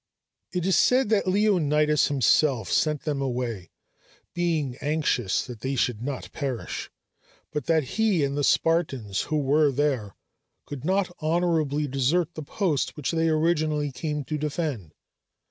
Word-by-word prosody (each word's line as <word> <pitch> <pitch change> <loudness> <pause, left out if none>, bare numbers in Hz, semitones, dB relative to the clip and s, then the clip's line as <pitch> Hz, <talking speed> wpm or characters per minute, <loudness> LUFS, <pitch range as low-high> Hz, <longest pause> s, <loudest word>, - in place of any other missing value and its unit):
It 180 -2 -2
is 190 - +3
said 255 -2 +3
that 210 -3 +2
Leonidas 150 -7 +3
himself 135 -2 +2
sent 150 -2 +1
them 145 -3 -2
away, 120 -8 -3 0.6
being 160 -7 -1
anxious 150 -10 0
that 120 -4 -9
they 135 +3 -2
should 120 -3 0
not 135 +1 -5
perish, 135 -6 -4 0.6
but 150 - -4
that 160 -2 +3
he 195 - +1
and 140 0 -1
the 145 - -1
Spartans 135 - +1
who 155 - +1
were 145 +1 +3
there 130 -8 -1 0.5
could 145 -4 -7
not 185 +1 0
honorably 155 -3 +1
desert 145 +6 0
the 155 - -6
post 155 -1 -1
which 150 - -2
they 165 -1 +1
originally 155 -2 +1
came 150 +2 -3
to 150 +3 -4
defend. 145 - -3
150 Hz, 145 wpm, -26 LUFS, 135-165 Hz, 0.6 s, is